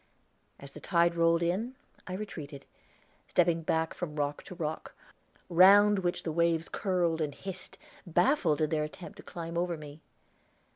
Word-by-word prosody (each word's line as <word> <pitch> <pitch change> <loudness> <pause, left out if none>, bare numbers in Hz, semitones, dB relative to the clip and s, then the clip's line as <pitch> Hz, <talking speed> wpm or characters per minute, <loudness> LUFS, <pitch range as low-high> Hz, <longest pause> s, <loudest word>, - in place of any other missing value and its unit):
As 140 0 -10
the - - -11
tide 170 -2 +2
rolled 170 0 +3
in 210 +10 -1 0.3
I 185 - -5
retreated, 150 -9 -7 0.6
stepping 170 -2 +2
back 160 0 0
from 160 -4 -6
rock 145 -1 -2
to 180 - -9
rock, 160 -2 -5 0.5
round 200 +3 +6
which 175 -2 -2
the 160 - -2
waves 170 0 +1
curled 175 -4 0
and 145 -2 -2
hissed, 190 -1 -8 0.3
baffled 175 - +2
in 155 - +1
their 155 -1 +1
attempt 155 +2 -9
to - - -12
climb 170 0 -5
over 175 -1 -1
me. 150 0 -11
170 Hz, 155 wpm, -30 LUFS, 155-180 Hz, 0.6 s, round